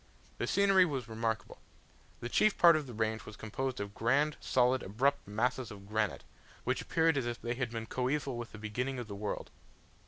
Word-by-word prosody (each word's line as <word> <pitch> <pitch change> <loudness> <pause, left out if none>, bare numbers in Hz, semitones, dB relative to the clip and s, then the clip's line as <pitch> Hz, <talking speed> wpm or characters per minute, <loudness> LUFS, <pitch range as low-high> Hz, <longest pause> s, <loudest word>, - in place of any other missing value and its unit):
The - - -1
scenery 195 -2 +5
was 135 -9 -2
remarkable 110 0 -3 0.6
The 120 - -3
chief 215 +10 +3
part 170 -2 +8
of 150 -3 -1
the 125 - -8
range 110 0 -1
was 110 - -10
composed 130 +4 -3
of 100 0 -4
grand, 145 +8 +2
solid, 125 0 +2
abrupt 135 +8 0
masses 120 +3 0
of 100 -1 -11
granite, 105 0 -1 0.4
which - - 0
appeared 160 -2 +2
as 125 -3 0
if 120 0 -3
they 120 - -2
had 125 -1 -2
been 115 -1 -4
coeval 130 +2 -1
with 120 0 -6
the - - -9
beginning 125 +5 -3
of 120 -2 -5
the 100 - -6
world. 100 +1 -4
120 Hz, 195 wpm, -32 LUFS, 110-135 Hz, 0.6 s, part